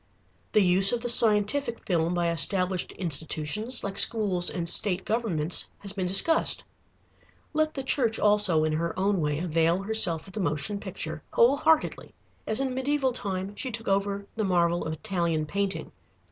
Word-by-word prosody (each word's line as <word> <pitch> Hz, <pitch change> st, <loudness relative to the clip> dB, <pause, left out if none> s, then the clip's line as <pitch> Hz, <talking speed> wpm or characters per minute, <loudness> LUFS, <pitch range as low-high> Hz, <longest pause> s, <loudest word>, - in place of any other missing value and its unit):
The 210 Hz, -, +4 dB
use 190 Hz, +2 st, +5 dB
of 240 Hz, -, -1 dB
the 240 Hz, -, -3 dB
scientific 230 Hz, +3 st, +3 dB
film 170 Hz, -1 st, 0 dB
by 170 Hz, -1 st, 0 dB
established 180 Hz, +2 st, 0 dB
institutions 165 Hz, -, -3 dB
like 200 Hz, -1 st, -3 dB
schools 200 Hz, -6 st, +3 dB
and 170 Hz, -2 st, -4 dB
state 185 Hz, +1 st, 0 dB
governments 185 Hz, -8 st, 0 dB
has 200 Hz, -1 st, -5 dB
been 185 Hz, -2 st, -3 dB
discussed. 195 Hz, -, +3 dB, 0.9 s
Let 310 Hz, 0 st, 0 dB
the 270 Hz, -, -4 dB
Church 240 Hz, -4 st, 0 dB
also, 205 Hz, -6 st, +3 dB
in 155 Hz, 0 st, 0 dB
her 165 Hz, +2 st, -3 dB
own 195 Hz, -1 st, 0 dB
way, 150 Hz, -1 st, -1 dB
avail 165 Hz, +2 st, 0 dB
herself 190 Hz, -7 st, +3 dB
of 190 Hz, -, -14 dB
the 220 Hz, -, -5 dB
motion 160 Hz, +3 st, -2 dB
picture, 160 Hz, -5 st, -6 dB
whole 245 Hz, +5 st, +4 dB
heartedly, 315 Hz, +1 st, 0 dB, 0.3 s
as 220 Hz, -, +1 dB
in 270 Hz, -1 st, -1 dB
mediæval 265 Hz, 0 st, -1 dB
time 195 Hz, -4 st, -5 dB
she 260 Hz, -, -5 dB
took 230 Hz, -1 st, -6 dB
over 200 Hz, 0 st, -1 dB
the 220 Hz, -, -2 dB
marvel 175 Hz, -2 st, +1 dB
of 160 Hz, -, -3 dB
Italian 170 Hz, -3 st, -2 dB
painting. 190 Hz, -1 st, -3 dB
195 Hz, 165 wpm, -26 LUFS, 170-220 Hz, 0.9 s, use